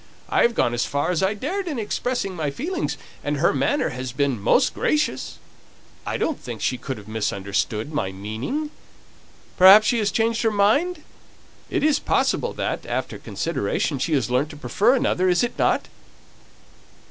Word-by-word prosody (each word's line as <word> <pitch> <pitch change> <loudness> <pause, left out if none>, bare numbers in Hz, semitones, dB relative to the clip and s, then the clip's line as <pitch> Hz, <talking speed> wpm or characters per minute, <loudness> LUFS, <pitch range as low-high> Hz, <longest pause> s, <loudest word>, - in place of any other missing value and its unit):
I - - +2
have 235 -1 +3
gone 120 - +2
as 120 - 0
far 145 +5 -1
as 175 - 0
I 190 +2 +1
dared 365 - -3
in 300 -6 -3
expressing 220 -2 -2
my 155 -4 -1
feelings, 335 - -3 0.3
and 145 0 -1
her 165 +5 +3
manner 135 -1 +1
has 130 0 -5
been 135 -4 -1
most 255 - +3
gracious. 300 0 -1 0.7
I - - -1
don't 315 - -1
think 120 -3 -7
she 125 +4 -1
could 130 0 -5
have 105 -1 -12
misunderstood 105 +3 -2
my 95 -10 -1
meaning. 110 - -4 0.9
Perhaps 195 +4 +9
she 235 +1 +2
has 210 -2 +1
changed 225 +1 0
her 225 - +3
mind? 285 - +2 0.7
It - - -1
is 305 -1 +3
possible - - 0
that, - - -3
after - - -3
consideration, 165 - -2
she 160 +5 -1
has 125 -5 0
learnt 130 +5 +1
to 150 - -10
prefer 215 - +2
another, 185 -7 +1
is 180 +5 +3
it 240 - -2
not?" - - +2
180 Hz, 170 wpm, -23 LUFS, -, 0.9 s, Perhaps